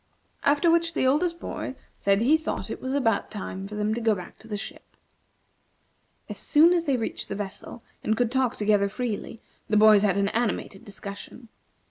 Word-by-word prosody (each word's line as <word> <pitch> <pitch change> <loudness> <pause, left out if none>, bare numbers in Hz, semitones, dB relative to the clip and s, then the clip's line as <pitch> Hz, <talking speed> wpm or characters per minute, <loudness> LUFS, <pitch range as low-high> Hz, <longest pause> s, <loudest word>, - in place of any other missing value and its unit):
After 295 +4 +3
which 335 -1 +2
the - - +1
oldest 335 +6 +2
boy - - -5 0.2
said 200 0 +3
that - - +2
he 285 +6 +5
thought 315 0 -3
it - - -6
was 260 +1 -2
about 225 -7 +1
time 195 -2 -6
for 210 - -8
them 210 +1 0
to 235 - -3
go 225 -2 +3
back 180 -2 -10
to 225 - -14
the 210 -2 -3
ship. - - -10 1.3
As - - -5
soon 320 +4 +5
as 340 -1 +1
they 275 -3 +2
reached 225 - -4
the - - -3
vessel, 205 +3 -7 0.2
and 220 0 +1
could 240 -1 +1
talk 260 -1 +1
together 205 -1 +2
freely, 225 0 -4 0.3
the 210 - +3
boys 215 -1 +7
had 200 -2 +2
an 200 0 +2
animated 220 -4 -2
discussion. 200 +4 -9
225 Hz, 195 wpm, -26 LUFS, 205-265 Hz, 1.3 s, boys